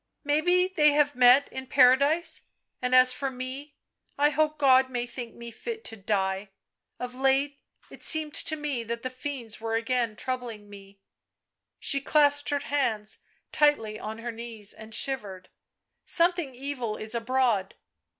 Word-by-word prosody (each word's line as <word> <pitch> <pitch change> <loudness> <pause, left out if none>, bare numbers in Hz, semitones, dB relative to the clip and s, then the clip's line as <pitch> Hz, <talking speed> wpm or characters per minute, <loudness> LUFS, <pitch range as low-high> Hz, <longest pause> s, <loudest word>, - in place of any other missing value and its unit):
" - - -54
Maybe 350 +5 +2
they 300 -6 +3
have 290 0 +2
met 250 +3 +5
in 265 0 -7
Paradise 280 +6 +3 0.2
— - - -51
and 250 0 +1
as 255 0 +7
for 270 +1 -3
me 265 +3 -7 0.4
I 295 +1 +3
hope 305 0 0
God 265 -2 +4
may 245 -1 -3
think 240 -1 -8
me 235 0 -9
fit 450 - -7
to 225 - -6
die 195 -1 -2 0.3
— - - -55
of 250 0 -5
late 270 +2 +1 0.3
it - - -12
seemed 310 -2 +4
to 315 - +2
me 295 -5 -3
that 235 +1 -5
the 255 - -3
fiends 255 -4 -5
were 225 0 -2
again 230 -1 -1
troubling 240 -4 -5
me 200 -1 -14 0.3
" - - -60
— - - -60
she 275 -1 +1
clasped 290 0 +2
her 290 - +1
hands 235 -7 -2 0.3
tightly 225 -8 +2
on 215 +1 -6
her 235 +1 -5
knees 225 -3 -6
and 220 0 -11
shivered; 200 -9 -3 0.3
" - - -56
something 340 -6 +1
evil 250 -5 -4
is 215 +1 -2
abroad 235 -4 0
255 Hz, 170 wpm, -27 LUFS, 225-290 Hz, 0.4 s, as